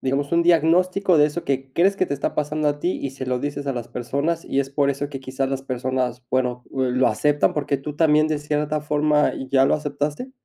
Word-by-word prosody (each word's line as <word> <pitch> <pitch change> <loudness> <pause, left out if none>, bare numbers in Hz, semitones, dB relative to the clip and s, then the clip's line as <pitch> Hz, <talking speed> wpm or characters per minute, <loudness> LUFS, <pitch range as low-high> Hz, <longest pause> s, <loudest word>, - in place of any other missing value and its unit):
digamos, 140 +2 -1
un 170 0 +2
diagnóstico 175 +2 +3
de 150 - +6
eso 160 +3 -4
que 135 -1 -2
crees 195 +7 +3
que 185 - +1
te 140 - -2
está 140 - -2
pasando 150 0 0
a 145 0 -2
ti 175 +4 0
y 140 - -2
se 135 -1 -7
lo 125 -1 -1
dices 145 0 -4
a 140 - 0
las 120 -1 -5
personas, 140 +8 -2
y 135 - 0
es 135 0 -4
por 140 0 +1
eso 140 +1 -3
que 135 -2 -6
quizás 130 +1 -3
las 135 0 -3
personas, 130 -1 -2
bueno, 125 -1 0
uh, 130 - -2
lo 130 0 +2
aceptan, 145 +7 +2
porque 145 -1 -1
tú 145 +2 -7
también 155 -1 +4
de 155 -1 0
cierta 150 +1 -1
forma 150 0 +2 0.2
ya 135 -1 +5
lo - - +3
aceptaste? 150 - -3
145 Hz, 235 wpm, -22 LUFS, 135-155 Hz, 0.2 s, de